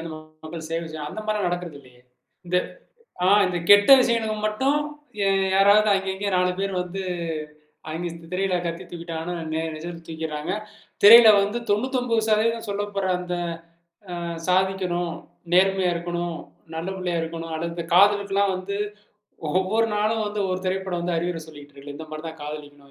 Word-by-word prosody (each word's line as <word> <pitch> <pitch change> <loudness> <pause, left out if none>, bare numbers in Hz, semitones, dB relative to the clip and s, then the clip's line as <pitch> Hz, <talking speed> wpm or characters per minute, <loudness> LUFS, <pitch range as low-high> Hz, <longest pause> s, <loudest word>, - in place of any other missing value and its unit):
வந்து 165 -1 -6 0.3
மக்கள் 160 0 -7
சேவை 165 +1 -2
செய்யணும்," 150 -1 -6
அந்த 215 - -6
மாரிலாம் 210 -4 0
நடக்கறது 175 -4 -4
இல்லையே! 125 -2 -20 0.5
இந்த 180 +1 0 0.7
அ - - +4 0.2
இந்த 180 - -2
கெட்ட 205 +5 +8
விஷயங்களுக்கு 225 -3 0
மட்டும் 265 +7 +1 0.4
யே 195 - +2 0.3
யாராவது 205 +2 +5
அங்க 195 0 -2
இங்க 200 +1 -2
4 180 0 +2
பேர் 195 0 -1
வந்து, 185 +2 -5 0.9
அங்க 165 +3 -3 0.3
திரையில 190 0 0
கத்தி 170 0 -4
தூக்கிட்டாங்கன்னா 170 0 -5 0.2
நேர் 160 0 -2
நிஜத்தில 165 +1 -8
தூக்கிறாங்க. 160 -2 -4 0.5
திரையில 230 +2 +11
வந்து 205 +4 -1
99% 230 -1 +1
சொல்லப்படுற 200 -1 -2
அந்த 180 0 -5 0.9
அ - - -6 0.3
சாதிக்கணும், 180 -2 +1 0.4
நேர்மையா 190 0 +4
இருக்கணும், 175 0 -3 0.4
நல்ல 165 +2 -4
பிள்ளையா 180 -2 -2
இருக்கணும். 165 0 -6
அடுத்து 170 +1 -4
காதலுக்கெல்லாம் 200 0 +4
வந்து 195 +2 -4 0.8
ஒவ்வொரு 195 +5 +2
நாளும் 215 +1 +1
வந்து 205 0 -3
ஒவ்வொரு 185 0 -2
திரைப்படம் 185 -1 -2
வந்து 175 0 -1
அறிவுரை 175 -1 -2
சொல்லிக்கிட்டு 145 -2 -13
இருக்குல, 140 +1 -10
இந்த 160 +1 -8
மாதிரி 155 +1 -7
தான் 160 -1 -10
காதலிக்கணும். 145 -2 -9
180 Hz, 145 wpm, -24 LUFS, 165-205 Hz, 0.9 s, திரையில